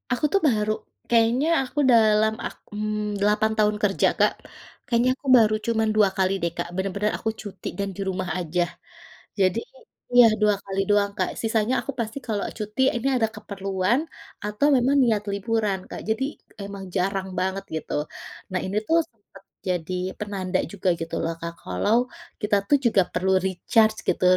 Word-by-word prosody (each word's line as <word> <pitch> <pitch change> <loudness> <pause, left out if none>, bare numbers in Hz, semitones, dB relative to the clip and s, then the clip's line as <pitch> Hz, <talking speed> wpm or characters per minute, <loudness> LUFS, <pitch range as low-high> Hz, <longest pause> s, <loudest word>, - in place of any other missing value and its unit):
Aku 300 - -1
tuh 395 - +5
baru, 215 -3 +1 0.4
kayaknya 235 +5 +3 0.2
aku 265 +3 -4
dalam 220 -1 +5
ak - - -5 0.2
mmm, 210 -1 -2
8 210 +1 +3
tahun 210 -1 +3
kerja 195 -1 +3
Kak, - - +4 0.5
kayaknya 240 +1 +3
aku 280 - -12
baru 215 -2 +4
cuman 220 -1 +1
2x 195 -3 +3
deh 170 - +1
Kak 175 - -2
bener-bener 195 +2 -1
aku 220 - -1
cuti 205 -3 -8
dan 200 - -1
di - - -5
rumah 185 -1 -3
aja, 175 0 -1 0.8
jadi 190 +3 +3 0.5
iya 245 -1 +9 0.2
2x 200 -2 +1
doang 200 -1 +3
Kak - - 0
sisanya 225 +1 +1
aku - - -4
pasti 225 +2 -3
kalau 210 -2 -1
cuti 215 +3 -3
ini 240 +3 -1
ada 225 -3 +2
keperluan, 195 +2 -1 0.4
atau 210 +7 +1
memang 260 +2 +3
niat 220 -4 +2
liburan 200 0 0
Kak - - -6
jadi 220 +4 +1 0.4
emang 200 -1 -7
jarang 190 +1 0
banget 190 +1 -1
gitu 160 - -5 0.6
nah 185 - 0
ini 195 +2 -2
tuh 330 - +4
sempet 205 -3 -20 0.3
jadi 180 0 -2 0.3
penanda 190 -3 -2
juga 200 -2 -4
gitu 165 0 -4
loh 165 - -1
Kak 170 0 -4
kalau, 90 - +1 0.5
kita 210 0 +2
tuh 290 - +6
juga 220 -4 +5
perlu 185 +2 +1
recharge 215 +4 +2
gitu - - +1
210 Hz, 165 wpm, -24 LUFS, 190-225 Hz, 0.8 s, iya